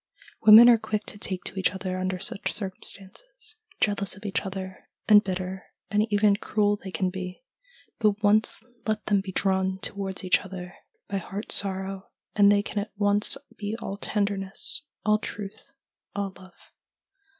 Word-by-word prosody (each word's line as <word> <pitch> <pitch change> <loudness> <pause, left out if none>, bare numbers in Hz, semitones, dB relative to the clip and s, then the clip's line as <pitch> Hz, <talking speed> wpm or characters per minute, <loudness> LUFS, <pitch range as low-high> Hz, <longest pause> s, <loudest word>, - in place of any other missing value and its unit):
Women 220 +2 +10
are 235 -2 +7
quick 215 -1 -3
to 205 - -11
take 185 -3 -4
to 195 - -5
each 190 +1 +1
other 185 -1 -3
under 185 0 -1
such 195 +2 -4
circumstances. 430 - -7 0.2
Jealous 200 -3 +1
of 205 - -13
each 200 - -1
other, 190 -1 -7 0.2
and 210 -1 +8
bitter 185 0 -4 0.3
and 210 +1 +1
even 205 -1 +4
cruel 205 0 +1
they 190 - -6
can 185 0 -1
be, 185 +4 -7 0.6
but 210 -1 +1
once 210 +2 +4 0.2
let 215 0 -1
them 205 -2 +2
be 190 -1 -7
drawn 190 0 +1
towards 195 -1 -5
each 185 - +4
other 185 -1 -8 0.3
by 200 - -2
heart 195 +3 -6
sorrow 195 0 -1 0.3
and 205 -1 +6
they 205 0 +3
can 210 - -3
at 205 - -5
once 205 0 +2 0.2
be 210 0 -4
all 195 - -5
tenderness, 200 0 -1 0.2
all 215 0 +4
truth, 205 +5 -8 0.4
all 200 -1 -2
love. 185 -1 -17
200 Hz, 160 wpm, -26 LUFS, 190-210 Hz, 0.6 s, Women